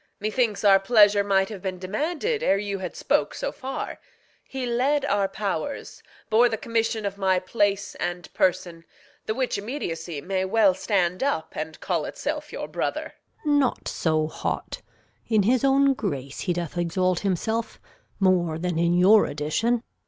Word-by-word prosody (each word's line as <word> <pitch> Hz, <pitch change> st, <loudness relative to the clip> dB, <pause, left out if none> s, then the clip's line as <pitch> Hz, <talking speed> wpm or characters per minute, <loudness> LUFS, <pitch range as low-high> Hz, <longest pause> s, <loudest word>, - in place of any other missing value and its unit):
Methinks 215 Hz, 0 st, 0 dB
our 195 Hz, -1 st, +7 dB
pleasure 205 Hz, -1 st, +5 dB
might 195 Hz, 0 st, +2 dB
have 205 Hz, -4 st, -7 dB
been 185 Hz, -1 st, -3 dB
demanded 315 Hz, -, -2 dB
Ere 195 Hz, -, +3 dB
you 200 Hz, -1 st, -3 dB
had 180 Hz, -2 st, -5 dB
spoke -, -, 0 dB
so -, -, -3 dB
far. 265 Hz, +1 st, -5 dB, 0.4 s
He 265 Hz, -1 st, -5 dB
led 265 Hz, +4 st, +1 dB
our 200 Hz, -6 st, +1 dB
powers, 200 Hz, -, -4 dB, 0.3 s
Bore 235 Hz, +3 st, +4 dB
the 220 Hz, -, -2 dB
commission 225 Hz, -1 st, -1 dB
of 200 Hz, 0 st, -4 dB
my 190 Hz, -1 st, +3 dB
place 200 Hz, +1 st, 0 dB
and 175 Hz, -1 st, -5 dB
person, 175 Hz, -2 st, 0 dB, 0.4 s
The 215 Hz, -, -1 dB
which 255 Hz, -5 st, -1 dB
immediacy 170 Hz, -, -4 dB
may 190 Hz, +5 st, -2 dB
well 195 Hz, 0 st, +4 dB
stand 185 Hz, -2 st, 0 dB
up 280 Hz, +1 st, 0 dB
And -, -, -5 dB
call -, -, -1 dB
itself -, -, -4 dB
your -, -, -5 dB
brother. -, -, -3 dB, 0.3 s
Gon. 290 Hz, -1 st, +4 dB
Not 265 Hz, -3 st, 0 dB
so 155 Hz, -2 st, 0 dB
hot! -, -, -4 dB, 0.5 s
In 215 Hz, -3 st, +3 dB
his 245 Hz, +5 st, +2 dB
own 275 Hz, 0 st, +4 dB
grace 140 Hz, -, -4 dB
he 180 Hz, -, -1 dB
doth 175 Hz, 0 st, -4 dB
exalt 180 Hz, +1 st, +1 dB
himself 220 Hz, +4 st, -2 dB, 0.4 s
More 180 Hz, -4 st, +2 dB
than 175 Hz, -1 st, -2 dB
in 170 Hz, +1 st, +2 dB
your 200 Hz, +4 st, +6 dB
addition. 215 Hz, +12 st, 0 dB
200 Hz, 160 wpm, -25 LUFS, 180-230 Hz, 0.5 s, our